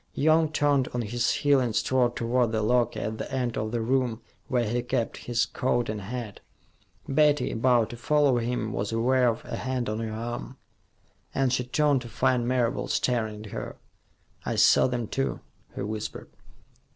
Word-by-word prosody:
Young 155 +1 +3
turned 145 -4 +2
on 120 - 0
his 120 +2 0
heel 145 -1 +3
and 120 -4 -1
strode 120 +2 +2
toward 120 0 +1
the 110 -1 0
locker 120 +1 +1
at 110 +1 -4
the - - -5
end 125 -3 -1
of 110 0 -2
the 120 -1 -1
room 125 -1 0 0.3
where 120 -3 +1
he 120 +3 0
kept 120 -1 -2
his 120 -1 +2
coat 120 -2 -1
and 105 -1 -3
hat. 110 0 -6 0.7
Betty, 150 +1 +3
about 120 -1 +2
to 120 - -8
follow 140 +1 +3
him, 115 -2 -2
was 100 +2 -2
aware 125 +3 +2
of 115 -1 -1
a - - -5
hand 130 -1 -2
on 110 +1 -2
her 110 -1 -3
arm, 115 - -5 0.8
and 135 -2 +2
she 125 - +1
turned 145 0 +2
to 120 - -9
find 120 +1 +1
Marable 125 -2 0
staring 110 -3 -1
at 105 - -10
her. - - -5 0.7
"I - - -2
saw - - +5
them, 125 -2 -2
too," 65 -8 -2 0.4
he - - -3
whispered. 110 +1 -5
120 Hz, 180 wpm, -27 LUFS, 110-130 Hz, 0.8 s, saw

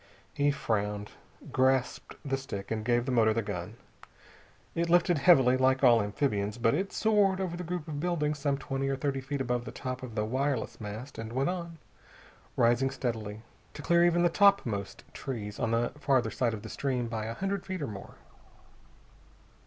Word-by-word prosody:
He 145 0 +2
frowned, 105 -6 -2 0.4
grasped 130 -1 +1
the 135 -1 0
stick, 110 -8 -6
and 110 -1 -1
gave 120 +1 +1
the 130 - -2
motor 110 -3 +3
the 115 - 0
gun. 100 +1 -5 1.0
It 170 0 -1
lifted 175 -2 +4
heavily, 130 -6 +6
like 130 +1 +2
all 120 -3 +7
amphibians, 105 -1 -1
but 115 -1 +2
it 190 +6 -1
soared 205 -3 +2
over 185 -3 -2
the 180 - -5
group 175 -1 -4
of 150 -2 -4
buildings 150 -3 -1
some 140 0 0
twenty 135 0 -3
or 135 - 0
thirty 135 0 -2
feet 140 +1 -3
above 125 -1 -1
the - - -7
top 130 -1 -5
of 125 -4 -8
the 105 -1 0
wireless 130 +1 -2
mast 110 +6 -7
and 115 0 -6
went 135 +6 +1
on, 170 -2 -6 0.8
rising 120 +3 +3
steadily, 110 -5 -4 0.3
to 145 - -8
clear 170 +3 +4
even 175 0 +3
the 175 - +5
topmost 165 - +2
trees 110 -6 -5
on 115 - 0
the 115 +1 +1
farther 130 -6 +2
side 115 -1 0
of 105 - -10
the - - -7
stream 125 -4 -2
by 110 -1 -3
a 115 - -4
hundred 195 0 -2
feet 185 -5 -3
or - - -2
more. 100 -3 -9
130 Hz, 185 wpm, -29 LUFS, 115-150 Hz, 1.0 s, all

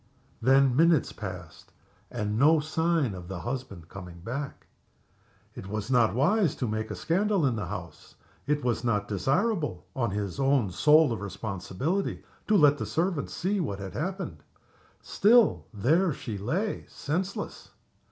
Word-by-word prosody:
Then 135 +1 +4
minutes 165 0 +4
passed. 90 -6 -9 0.4
And 105 +1 -2
no 155 +3 +6
sign 155 - 0
of 90 -2 -8
the 90 -2 -6
husband 120 -10 -5
coming 90 -2 -10
back. 135 +8 -5 0.9
It 95 - -9
was 105 +3 -4
not 120 -4 +3
wise 175 - +2
to 125 - -2
make 110 0 -3
a - - -4
scandal 190 0 +1
in 130 -4 +1
the 105 -5 -4
house. - - -8 0.3
It 150 0 0
was 120 0 0
not 105 -4 0
desirable 140 - 0
(on 120 -4 0
his 100 0 -4
own 135 -7 +2
sole 150 - +5
responsibility) 100 - -3 0.2
to 215 - +4
let 145 -3 +5
the - - -2
servants 170 -3 -1
see 195 +3 0
what 120 - -2
had 95 -1 -7
happened. 190 +4 -4 0.6
Still, 225 +1 +4
there 155 - +2
she 115 -5 -6
lay 165 - -2
senseless. 180 +6 -4
135 Hz, 145 wpm, -28 LUFS, 105-165 Hz, 0.9 s, no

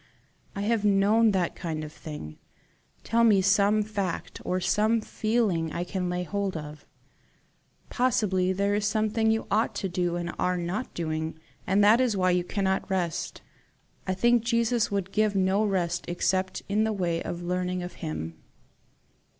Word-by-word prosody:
I 200 - -3
have 215 +1 +1
known 210 +3 +4
that 185 -4 0
kind 160 -3 -4
of 150 0 -8
thing. 150 - -8 0.6
Tell 235 +1 +2
me 215 -4 +5
some 205 +2 +3
fact 200 -4 -4
or 185 - -1
some 215 +5 +2
feeling 215 -7 0
I 175 - -2
can 180 0 -3
lay 180 0 -1
hold 200 -1 -2
of. 150 0 -9 1.0
Possibly 210 -7 +1
there 200 +2 0
is 205 0 +1
something 220 +1 +1
you 225 0 +1
ought 215 +3 +1
to 195 - -2
do 175 -1 -1
and 170 0 -3
are 180 0 +1
not 180 +8 -3
doing, 160 -1 -3 0.3
and 200 +2 +3
that 220 +4 +6
is 235 -6 +1
why 185 -1 +3
you 180 0 +2
cannot 190 +1 -1
rest. 180 -4 -2 0.6
I 185 - 0
think 240 +4 +3
Jesus 235 0 +1
would 195 -2 -2
give 215 -1 +1
no 190 +2 +2
rest 180 -4 -1
except 185 +2 -1
in 210 +2 +1
the 220 0 0
way 170 -4 -1
of 175 0 -5
learning 180 0 -2
of 175 - -6
him." 80 +1 -4
190 Hz, 165 wpm, -27 LUFS, 175-215 Hz, 1.0 s, that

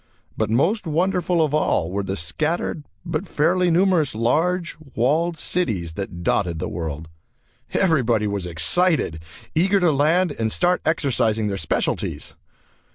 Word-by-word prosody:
But - - -1
most 170 - +1
wonderful 175 +1 +1
of 150 -2 -1
all 90 - +1
were 100 +1 -1
the 95 0 -4
scattered, 155 - -2 0.2
but 165 -3 -3
fairly 175 +4 +2
numerous 170 - +2
large, 165 +10 0 0.2
walled 160 +8 +1
cities 105 - -2
that 85 -2 -6
dotted 85 -2 0
the - - -3
world. 80 -2 -5 0.6
Everybody 125 - +2
was 100 -3 -2
excited, 85 - +1 0.3
eager 190 +5 +3
to 175 -3 +3
land 155 +3 +2
and 110 -1 0
start 180 +6 +1
exercising 120 -8 +1
their 100 -2 -2
specialties. 80 - -2
150 Hz, 135 wpm, -22 LUFS, -, 0.6 s, eager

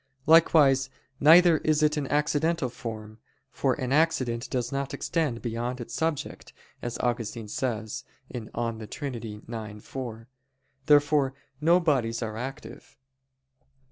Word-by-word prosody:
Likewise, 145 -4 +5 0.3
neither 165 +2 +7
is 155 0 +1
it 150 0 +3
an 145 -3 -2
accidental 150 0 +1
form, 110 -3 -8 0.3
for - - 0
"an 130 0 -4
accident 130 -6 +1
does 125 -1 -2
not 140 0 -3
extend 150 -9 -1
beyond 120 +2 -3
its 120 - -7
subject," 160 -3 -3 0.3
as 120 -1 -4
Augustine 115 -2 -2
says 110 -1 -3 0.3
(De 115 -2 -4
Trin. 115 -6 -6
ix, 110 -2 -7
4). 115 -4 -6 0.6
Therefore 145 -2 +4 0.3
no 170 +3 +5
bodies 125 -9 0
are 110 -1 -4
active. 130 +4 -8
130 Hz, 120 wpm, -27 LUFS, 115-150 Hz, 0.6 s, neither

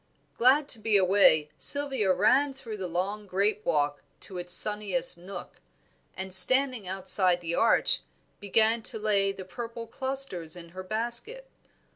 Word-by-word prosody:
Glad 275 +4 +2
to 230 - -2
be 215 -1 0
away, 185 -6 +1
Sylvia 270 -9 +4
ran 260 +9 0
through 230 -5 -10
the 190 -2 -7
long 195 +5 -6
grape 200 +3 -3
walk 145 -1 -3 0.2
to 185 -2 -5
its 175 0 -5
sunniest 200 -3 +1
nook, 180 +2 -12 0.6
and 190 0 -5
standing 250 +3 +7
outside 185 -1 +2
the 170 -1 -7
arch, 230 +6 0 0.4
began 220 +3 0
to 220 - -5
lay 205 -2 -1
the 190 -1 -11
purple 230 +3 -9
clusters 260 -11 -3
in 170 -1 -12
her 185 +2 -11
basket. 235 - -6
205 Hz, 145 wpm, -25 LUFS, 185-235 Hz, 0.6 s, standing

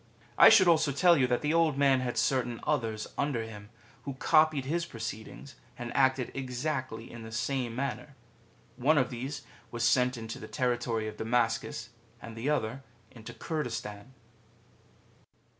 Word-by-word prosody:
^ - - -31 0.3
I - - +9
should 205 -5 +6
also 160 -4 +4
tell 170 +5 +5
you 130 -5 +3
that 125 +2 0
the 150 +1 +1
Old 165 -4 +2
Man 135 -2 +4
had 125 -1 -3
certain 125 -3 0
others 115 -8 -1
under 140 -5 0
him, 105 -2 -10 0.3
who 140 0 -6
copied 155 0 +3
his 170 +5 -1
proceedings 115 0 -7 0.2
and 120 -2 -6
acted 130 -2 +2
exactly 130 -3 -4
in 120 - -9
the 110 0 -9
same 120 +1 -2
manner. 135 +1 -4 0.6
One 145 +5 +3
of 130 -2 +2
these 130 +4 -5 0.3
was 120 +1 -4
sent 125 +2 +3
into 115 0 -7
the - - -8
territory 120 -4 -1
of 110 - -7
Damascus, 115 0 -1 0.3
and 115 -1 -10
the 115 +5 -2
other 135 -3 -1 0.3
into 115 -3 -10
Curdistan. 120 -6 -5
125 Hz, 160 wpm, -29 LUFS, 115-140 Hz, 0.6 s, I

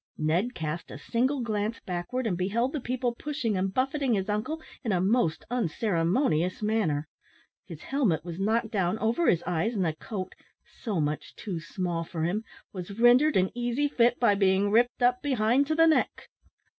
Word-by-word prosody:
Ned 175 +11 0
cast 160 +1 -4
a - - -8
single 255 - 0
glance 215 -1 -2
backward, 185 +8 -4
and 200 -5 0
beheld 220 +9 0
the 300 - -1
people 250 0 -1
pushing 240 -5 -2
and 190 +1 0
buffeting 265 +1 0
his 195 0 -2
uncle 215 +10 -2 0.2
in 225 - -1
a 185 - +2
most 190 -3 +1
unceremonious 185 - 0
manner. 190 -9 0 0.6
His 165 -3 -9
helmet 220 - 0
was 170 0 -6
knocked 220 +3 0
down 190 -2 0
over 230 +10 +1
his 170 - +2
eyes, 180 +7 -1
and 190 -3 +1
the 160 - 0
coat 185 +3 -6 0.5
so 210 -8 -1
much 150 0 -2
too 190 -6 -5
small 170 0 -3
for 165 -1 -4
him 195 +7 -1 0.3
was 195 +3 -7
rendered 250 +6 +5
an 185 0 +2
easy 245 +4 0
fit 240 -3 +2
by 235 -4 +4
being 195 0 +2
ripped 240 +3 +2
up 250 0 +3
behind 260 0 +2
to 315 - 0
the 325 +1 +6
neck. 320 -1 +1
215 Hz, 180 wpm, -28 LUFS, 180-245 Hz, 0.6 s, the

